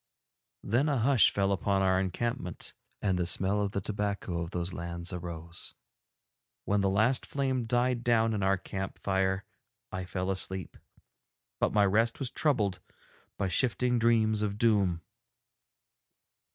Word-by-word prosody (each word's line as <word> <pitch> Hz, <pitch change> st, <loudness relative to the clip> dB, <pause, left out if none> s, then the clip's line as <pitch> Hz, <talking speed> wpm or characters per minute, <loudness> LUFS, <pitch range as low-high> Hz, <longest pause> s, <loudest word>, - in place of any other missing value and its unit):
Then 125 Hz, +9 st, +1 dB
a 140 Hz, -, +1 dB
hush 125 Hz, 0 st, +5 dB
fell 100 Hz, 0 st, 0 dB
upon 100 Hz, 0 st, +1 dB
our 95 Hz, 0 st, +3 dB
encampment, 95 Hz, 0 st, -3 dB, 0.3 s
and 95 Hz, -3 st, +1 dB
the 85 Hz, -, 0 dB
smell 95 Hz, +4 st, +1 dB
of 100 Hz, -, 0 dB
the 100 Hz, 0 st, -3 dB
tobacco 100 Hz, -4 st, -2 dB
of 85 Hz, -, -4 dB
those 90 Hz, +1 st, -3 dB
lands 85 Hz, 0 st, -5 dB
arose. 85 Hz, -1 st, -7 dB, 0.9 s
When 100 Hz, 0 st, +2 dB
the 100 Hz, -, +2 dB
last 110 Hz, +7 st, +2 dB
flame 130 Hz, -3 st, -1 dB
died 120 Hz, +1 st, +1 dB
down 115 Hz, -1 st, +3 dB
in 105 Hz, -, -1 dB
our 95 Hz, 0 st, +3 dB
camp 95 Hz, 0 st, -5 dB
fire 95 Hz, 0 st, 0 dB, 0.5 s
I 95 Hz, 0 st, -4 dB
fell 90 Hz, +1 st, -2 dB
asleep, 95 Hz, -1 st, -2 dB, 0.8 s
but -, -, +2 dB
my 105 Hz, -1 st, +4 dB
rest 115 Hz, +4 st, +2 dB
was 135 Hz, -4 st, -1 dB
troubled 105 Hz, -, +1 dB, 0.6 s
by 100 Hz, -, 0 dB
shifting 125 Hz, +4 st, +1 dB
dreams 110 Hz, -2 st, +3 dB
of 105 Hz, -1 st, -1 dB
doom. 100 Hz, -7 st, +2 dB
100 Hz, 145 wpm, -30 LUFS, 95-115 Hz, 0.9 s, hush